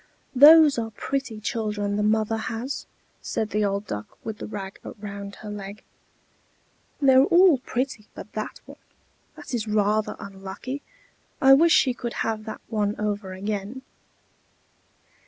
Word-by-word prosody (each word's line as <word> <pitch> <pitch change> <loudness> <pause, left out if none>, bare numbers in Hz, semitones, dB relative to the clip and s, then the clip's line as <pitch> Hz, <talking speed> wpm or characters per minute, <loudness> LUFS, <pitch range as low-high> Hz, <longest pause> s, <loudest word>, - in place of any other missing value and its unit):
"Those 295 0 +8
are 225 -1 -3
pretty 255 0 -4
children 210 -2 -2
the 210 - 0
mother 220 +1 +1
has," 230 +5 -4 0.3
said 215 -1 -3
the 210 0 +1
old 200 0 -1
Duck 105 - -7
with 220 -1 -6
the - - -6
rag 195 -2 -7 0.2
round 200 -1 -7
her 215 - -9
leg. 205 0 -8 1.2
"They're 265 -2 +6
all 345 -5 +5
pretty 250 -4 -3
but - - -10
that 215 0 -5
one; - - -13 0.6
that - - -10
is 225 -2 -2
rather 210 0 +1
unlucky. 200 +8 -7 0.6
I 270 -1 +7
wish 325 +4 +6
she 255 - +4
could 240 -1 -5
have 220 -1 -2
that 220 - -7
one 210 -2 -1
over 205 -2 -3
again." 205 +6 -4
215 Hz, 140 wpm, -25 LUFS, 205-255 Hz, 1.2 s, Those